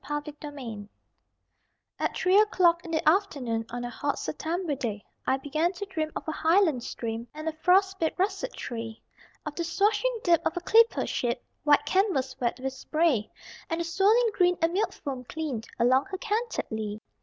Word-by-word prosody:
GREEN 295 +1 -2 0.2
ESCAPE 240 -9 -7 1.1
At - - -1
three 375 +2 +4
o'clock 355 -5 +4
in 340 - -9
the 315 -2 -1
afternoon 275 - +1
On 245 0 -5
a - - -3
hot 285 +4 -2
September 330 +1 -2
day, 225 -7 -4 0.2
I 265 - +3
began 310 +6 0
to 390 +3 -5
dream 320 -6 -3
of - - -5
a - - 0
highland 320 -4 +3
stream 230 0 -4
And 310 +1 -6
a - - +1
frostbit 365 +2 +2
russet 390 +6 -1
tree; 225 -2 -6 0.5
Of 300 - -4
the 340 - -3
swashing 435 +7 +1
dip 340 -3 +4
of 345 - -1
a - - -1
clipper 455 +6 +4
ship 240 0 -2 0.2
(White 295 -1 +5
canvas 375 -9 +1
wet 240 0 -1
with 265 0 -3
spray) 285 -5 +1 0.4
And 330 - -1
the - - 0
swirling 420 +7 +3
green 360 -2 +3
and 330 +1 +1
milk 400 +4 +1
foam 265 -4 -6
clean 295 -5 -4 0.2
Along 255 +3 +4
her 385 -1 -5
canted 455 +3 -2
lee. 215 -1 -3
320 Hz, 180 wpm, -27 LUFS, 255-375 Hz, 1.1 s, White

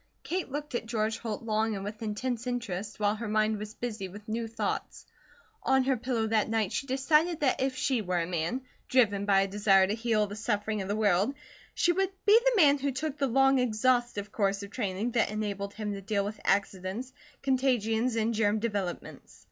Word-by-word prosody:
Kate 360 -5 -3
looked 290 0 -5
at 235 -2 -2
George 220 -1 -1
Holt 225 -1 -4
long 220 -1 0
and 195 - -5
with 210 +2 -6
intense 235 +3 -3
interest, 215 -5 -4
while 205 0 +2
her 225 +1 -5
mind 215 0 +1
was 210 +1 -7
busy 220 -5 -4
with 205 +3 -12
new 225 +1 -2
thoughts. 225 - -4 0.6
On 265 0 +3
her 265 0 +2
pillow 240 -2 -1
that 220 -1 +1
night 220 -3 0
she 275 - -2
decided 300 +5 +2
that 265 -3 +2
if 265 0 0
she 260 -4 0
were 180 -3 -1
a 165 - 0
man, 175 +8 -2 0.3
driven 205 -6 +3
by 195 -1 +5
a 195 - +1
desire 195 -1 +4
to 200 - -1
heal 225 -1 +1
the 205 0 -7
suffering 210 -1 -1
of 190 - -5
the 205 - -1
world, 210 +4 +2 0.4
she 345 - +3
would 380 +2 +1 0.2
be 420 +2 +7
the - - +3
man 290 -3 +6
who 280 +1 0
took 295 +2 -4
the 275 - +2
long 270 +2 +4
exhaustive 240 -3 +1
course 200 -2 0
of 200 - -9
training 210 0 -2
that 235 -3 +2
enabled 200 -1 -3
him 210 -1 -3
to 200 - -6
deal 200 0 -1
with 210 +1 -6
accidents, 195 +5 -1 0.3
contagions, 250 -3 +1
and 225 +1 +1
germ 210 -1 +2
developments. 205 -5 -4
220 Hz, 205 wpm, -29 LUFS, 205-255 Hz, 0.6 s, be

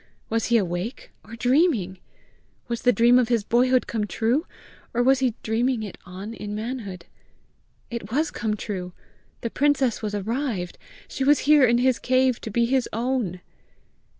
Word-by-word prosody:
Was 225 0 0
he 235 - +4
awake 185 +4 -3
or 225 +1 -10
dreaming? 245 - +2 0.7
Was 235 -1 -3
the 245 - +5
dream 240 +1 +5
of 245 - +2
his 235 -3 +1
boyhood 250 +3 +3
come 215 -2 -2
true? 235 - 0 0.5
or 245 - +3
was 265 +1 +4
he 255 -4 +1
dreaming 230 +1 0
it 205 - -8
on 190 +5 -7
in 210 -2 -6
manhood? 215 -6 -5 0.9
It 235 -4 -5
was 305 +6 0
come 215 -2 -2
true! 185 -4 -5 0.5
The 230 - -3
princess 275 -4 +1
was 210 -2 -3
arrived! 215 -3 -3 0.3
She 270 - -3
was 290 +1 +4
here 295 -3 +6
in 235 +1 +3
his 255 0 +2
cave 255 -1 +2
to - - -6
be 235 +3 +2
his 260 +1 +1
own! 230 -6 -2
235 Hz, 165 wpm, -24 LUFS, 210-255 Hz, 0.9 s, here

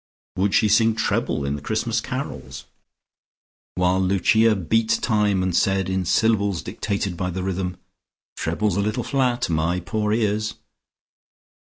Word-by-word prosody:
Would 95 +1 +1
she 110 - +4
sing 110 +2 +4
treble 70 -9 -1
in 70 +1 -1
the 75 - -7
Christmas - - -1
Carols, - - -6 1.1
while 90 +1 +2
Lucia 105 +4 +3
beat 110 +5 +1
time, 105 -4 +1
and 90 -2 -1
said 95 -1 +1
in 95 -1 -1
syllables 100 -2 +1
dictated 100 -3 -3
by 90 +1 -2
the 90 +1 -4
rhythm, 90 -1 -3 0.6
"Trebles 95 +4 -1
a - - +2
little 110 +4 -1
flat! 125 -3 0
My 85 +2 0
poor 105 +3 -2
ears!"? 105 -1 0
100 Hz, 140 wpm, -23 LUFS, 90-110 Hz, 1.1 s, she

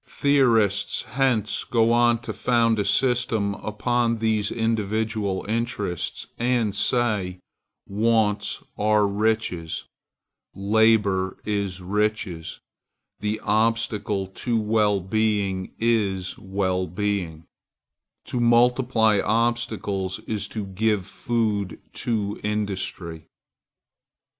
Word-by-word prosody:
Theorists 115 -8 +2
hence 120 -4 0
go 115 -1 +2
on 120 0 +4
to 110 -2 -5
found 115 0 +2
a 100 - 0
system 115 -2 +1
upon 115 +3 -1
these 110 -2 0
individual 110 -3 -1
interests, 110 -5 -2
and 120 -3 +1
say: 105 -5 +1 0.5
Wants 105 -1 +1 0.2
are 105 0 +3
riches: 100 -5 -1 0.7
Labor 100 -2 +2
is 100 -3 -2
riches: 105 -3 -2 0.6
The 105 +1 -2
obstacle 110 -2 +1
to 115 +5 -2
well 105 -2 +2
being 100 -2 0
is 100 -5 0
well 95 -1 -1
being: 90 -4 -2 0.8
To 125 - -3
multiply 120 -2 +3
obstacles 110 -4 0
is 105 -2 -3
to 105 -1 -5
give 100 0 0
food 105 -6 -2
to 105 -3 -2
industry. 95 -6 -3
105 Hz, 90 wpm, -24 LUFS, 100-115 Hz, 0.8 s, on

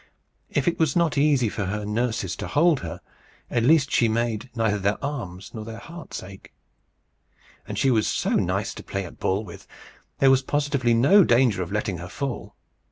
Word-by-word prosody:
If 145 - -1
it 170 - +1
was 160 -5 +2
not 170 -3 +2
easy 140 -4 +3
for 105 -1 -3
her 105 +2 -3
nurses 105 -3 -1
to - - -5
hold 160 -1 +3
her, 85 +1 -7 0.5
at 120 - +1
least 140 +2 +4
she 120 - +3
made 115 +1 -1
neither 110 -3 +1
their 100 +2 0
arms 95 -10 -6
nor 110 - -6
their 110 +1 -8
hearts 165 - -9
ache. 95 +1 -12 1.2
And - - -5
she 135 - +3
was 110 -3 +2
so - - -1
nice - - 0
to - - -10
play 100 -1 -4
at 85 - -12
ball 95 +3 0
with! 85 - -12 0.5
There 135 -1 +5
was 135 0 +4
positively 140 -4 +1
no 145 - +6
danger 120 - +3
of 90 0 -4
letting 105 -4 -2
her 90 +1 -7
fall. 135 +4 -5
115 Hz, 190 wpm, -24 LUFS, 100-140 Hz, 1.2 s, no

